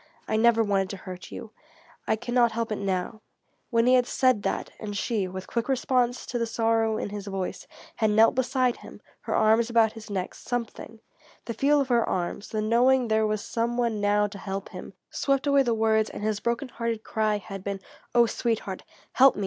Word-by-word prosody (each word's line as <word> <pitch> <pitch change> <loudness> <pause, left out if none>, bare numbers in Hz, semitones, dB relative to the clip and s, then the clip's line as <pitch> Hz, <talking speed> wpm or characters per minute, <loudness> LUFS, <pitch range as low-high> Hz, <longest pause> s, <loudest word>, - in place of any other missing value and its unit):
I - - 0
never 230 0 +4
wanted 195 -2 0
to 195 - -5
hurt 185 -1 -9
you; - - -8 0.6
I 220 - +3
can 240 +2 -6
not 240 -2 +4
help 230 -1 -2
it 215 - -1
now," 195 +2 -2 0.5
when 230 -1 +2
he 250 - +5
had 250 -1 +4
said 255 -5 +2
that, - - -2
and 205 -2 -5
she, 205 -3 -1
with 185 0 -7
quick 235 +2 -3
response 250 -2 +1
to 240 - -3
the 230 - 0
sorrow 225 -1 +1
in - - -3
his 205 0 -7
voice, 195 -2 -4 0.3
had 220 - +2
knelt 220 +2 +5
beside 255 -1 +1
him, - - -12 0.2
her - - -3
arms 220 +2 +3
about 230 -2 +4
his 225 -1 -11
neck, 190 -3 -3
something, 230 -2 -5 0.4
the 230 - -4
feel 285 +6 +3
of 275 -2 -1
her 235 -2 +3
arms, 180 +3 -3
the 215 -1 -2
knowing 245 +2 +3
there 220 0 +2
was 215 -1 -2
some 235 +1 -2
one 230 -4 0
now 205 0 +3
to 200 -1 -7
help 195 0 -5
him 180 +1 -9 0.2
swept 275 0 0
away 280 -1 +4
the 240 -3 +1
words 220 -1 +2
and - - -7
his 215 -1 0
broken 235 +4 -2
hearted 230 -2 -3
cry 215 -1 0
had 195 -1 -8
been: 200 -1 -3 0.4
"Oh, 240 0 +7
sweetheart 225 -5 -2 0.3
help 270 +1 +6
me! - - -6
225 Hz, 210 wpm, -26 LUFS, 205-240 Hz, 0.6 s, Oh